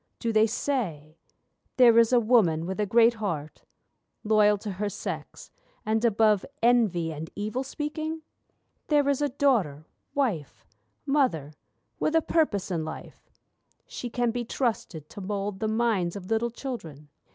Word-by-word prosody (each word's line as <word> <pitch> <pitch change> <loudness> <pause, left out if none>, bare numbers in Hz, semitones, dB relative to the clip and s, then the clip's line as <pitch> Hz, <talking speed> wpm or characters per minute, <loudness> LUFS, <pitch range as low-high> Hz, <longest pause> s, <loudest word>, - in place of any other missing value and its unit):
Do 230 -2 -2
they 220 +1 +5
say: 180 - -3 0.6
'There 235 -3 +7
is 230 0 +4
a 245 - +5
woman 210 -9 +3
with 190 +3 -4
a 210 - +1
great 230 +3 +5
heart, 170 -9 -5 0.6
Loyal 210 -1 +4
to 205 +1 -6
her 205 +2 -3
sex, - - -7 0.3
and 220 +1 0
above 215 -3 +3 0.2
envy 210 -9 +3
and 155 +2 -7
evil 215 +5 -3
speaking? 310 +3 -4 0.6
There 295 -2 +3
is 280 0 +1
a 290 - +1
daughter, 225 - +1 0.3
wife, 215 - -2 0.4
mother, 255 - +1 0.5
with 310 - 0
a 325 - +5
purpose 205 - 0
in 165 -3 -1
life: 155 - -9 0.6
She 245 - -6
can 240 0 0
be 240 +1 -3
trusted 220 - -3
to 205 - -9
mould 200 0 -3
the 220 - -1
minds 220 -6 0
of 195 +1 -8
little 225 +2 +1
children. 170 - -7
220 Hz, 150 wpm, -27 LUFS, 185-245 Hz, 0.6 s, There